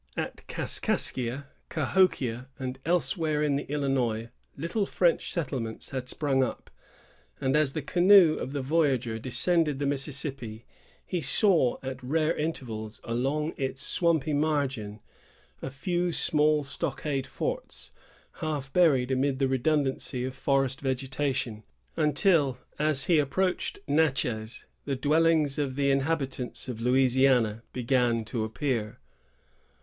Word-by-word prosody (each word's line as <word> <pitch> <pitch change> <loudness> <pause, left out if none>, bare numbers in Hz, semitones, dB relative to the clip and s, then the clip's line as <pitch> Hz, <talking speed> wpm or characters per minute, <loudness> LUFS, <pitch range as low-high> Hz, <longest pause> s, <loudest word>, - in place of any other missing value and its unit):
At - - -5
Kaskaskia, 130 +2 0 0.2
Cahokia, 135 -7 +1
and 130 -1 -5
elsewhere 160 -3 0
in 145 -2 +1
the 140 - -3
Illinois, 130 -6 0 0.3
little 170 +7 -1
French 175 -2 +1
settlements 130 -9 -4
had 130 -2 -4
sprung 140 -3 +1
up; 125 - -5 0.7
and 135 +1 +1
as 150 -3 +2
the 155 - -3
canoe 180 0 +6
of 135 - -4
the 140 -2 -3
voyager 130 -6 +1
descended 150 +5 +1
the 140 - -2
Mississippi, 135 -5 -3 0.4
he 180 -3 -2
saw, 160 - +3
at 130 0 -5
rare 155 +5 0
intervals, 115 -9 -4
along 135 +7 -1
its 135 +1 -2
swampy 160 -3 +1
margin, 135 -8 -1 0.6
a - - -4
few 175 +6 -1
small 150 -2 +2
stockade 140 0 -3
forts, - - -5 0.5
half 150 -5 -4
buried 140 -8 +4
amid 130 +1 +1
the 135 0 +1
redundancy 135 -1 0
of 130 - -4
forest 135 -1 0
vegetation, 130 -3 -2 0.3
until, 150 -3 +2 0.2
as 150 -3 +2
he 170 -3 +4
approached 180 +6 0
Natchez, 130 -7 0 0.2
the 140 - -1
dwellings 150 +1 +2
of 135 -3 -1
the 140 0 +1
habitans 135 -3 -2
of 120 -3 -5
Louisiana 125 -3 +3
began 120 -2 +1
to 110 0 -2
appear. 110 -1 -2
135 Hz, 125 wpm, -28 LUFS, 130-155 Hz, 0.7 s, canoe